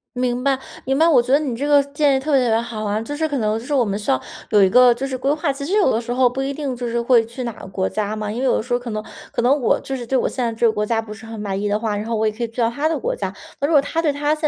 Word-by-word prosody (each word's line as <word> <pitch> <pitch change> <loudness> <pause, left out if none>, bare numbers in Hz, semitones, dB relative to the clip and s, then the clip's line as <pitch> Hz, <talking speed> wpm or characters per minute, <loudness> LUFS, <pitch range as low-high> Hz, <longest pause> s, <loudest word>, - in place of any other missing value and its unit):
明 250 0 -1
白， 275 -1 +2 0.3
明 270 +2 0
白， 325 - +5
我 285 -7 +5
觉 245 - -4
得 280 - +6
你 275 -6 -2
这 275 +5 -3
个 290 -1 +5
建 285 -2 +3
议 - - -1
特 295 +3 -2
别 270 - +5
特 235 - +1
别 225 +1 +3
好 230 -2 -5
啊。 210 0 -1
就 260 +6 -5
是 315 +2 -1
可 285 - -1
能 215 -1 0
就 225 - -7
是 290 - -3
我 250 -4 +3
们 200 0 -2
需 210 - -1
要 130 - +1 0.3
有 210 -2 +4
一 190 - +5
个 250 +4 +6
就 260 +3 -4
是 260 -1 -3
规 270 +2 0
划， 300 -1 0
其 280 +1 -6
实 330 - -5
有 400 - +4
的 225 -2 +1
时 240 +1 -4
候 250 0 +4
不 260 +2 -4
一 275 +1 -2
定 280 -3 -3
就 245 0 -5
是 235 0 -1
会 235 -1 +4
去 235 +3 -7
哪 235 - -3
个 - - -11
国 190 0 -2
家 215 -1 -2
嘛， 215 -1 -4
因 220 +3 -4
为 - - -2
有 265 - +3
的 - - -1
时 245 +2 -4
候 245 - +2
可 245 -1 -7
能 215 -1 -3 0.3
可 - - -1
能 255 +4 +3
我 - - +2
就 270 - -5
是 245 -2 -5
对 265 +3 +1
我 - - +1
现 255 - -3
在 235 - 0
这 230 +1 +2
个 - - +3
国 210 0 -1
家 225 0 0
不 220 -1 -9
是 220 +2 -12
很 225 -1 -8
满 200 -1 -3
意 210 - -1
的 205 +1 +1
话， 215 -2 -1
然 205 +1 -3
后 230 -1 -1
我 220 0 +1
也 215 - -1
可 235 +3 -5
以 235 - -1
去 230 - -21
到 230 - +3
他 285 +6 -1
的 320 - -1
国 - - -2
家， - - -4 0.3
那 285 - +2
如 - - -2
果 290 - +7
他 325 +3 -2
对 310 -3 +2
他 290 +2 0
现 305 - -14
245 Hz, 415 characters per minute, -21 LUFS, 220-275 Hz, 0.3 s, 果